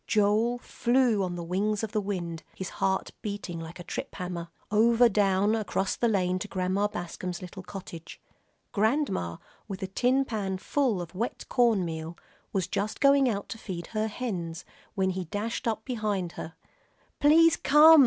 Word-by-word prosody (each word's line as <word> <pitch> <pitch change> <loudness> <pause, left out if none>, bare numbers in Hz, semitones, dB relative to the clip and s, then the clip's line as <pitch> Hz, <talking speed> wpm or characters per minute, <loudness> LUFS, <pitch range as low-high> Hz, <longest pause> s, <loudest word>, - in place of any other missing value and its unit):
Joel 215 +3 +3
flew 245 -3 +2
on 180 -2 -1
the 175 - -4
wings 200 +5 0
of 220 - -2
the 215 - 0
wind, 175 -5 -3
his 190 - -5
heart 190 0 +1
beating 200 -5 -4
like 165 +2 -8
a - - -6
trip - - -5
hammer, 175 -2 -4 0.2
over 230 +3 +6
down 200 -1 +3
across 195 -3 0
the 240 - +1
lane 185 -4 +1
to 205 - -4
Grandma 190 +1 0
Bascom's 175 -2 -5
little 185 +1 -8
cottage. 180 -4 -9 0.5
Grandma, 215 - +1 0.3
with 195 -2 -5
a - - -1
tin 255 +7 +2
pan 200 -6 -2
full 225 -2 0
of 170 - -11
wet 225 +6 -3
corn 230 -7 +3
meal, 160 0 -5 0.3
was 190 -3 0
just 205 +3 -2
going 275 -2 +5
out 200 -3 -2
to 225 - -6
feed 175 -5 -5
her 215 0 -1
hens, 185 -8 -4 0.3
when 190 -1 +2
he 185 -1 -3
dashed 210 +7 -3
up 220 -1 -1
behind 210 -8 -1
her. 160 0 -7 0.6
"Please 325 +3 +6
come!" 305 +3 +8
200 Hz, 170 wpm, -28 LUFS, 180-230 Hz, 0.6 s, come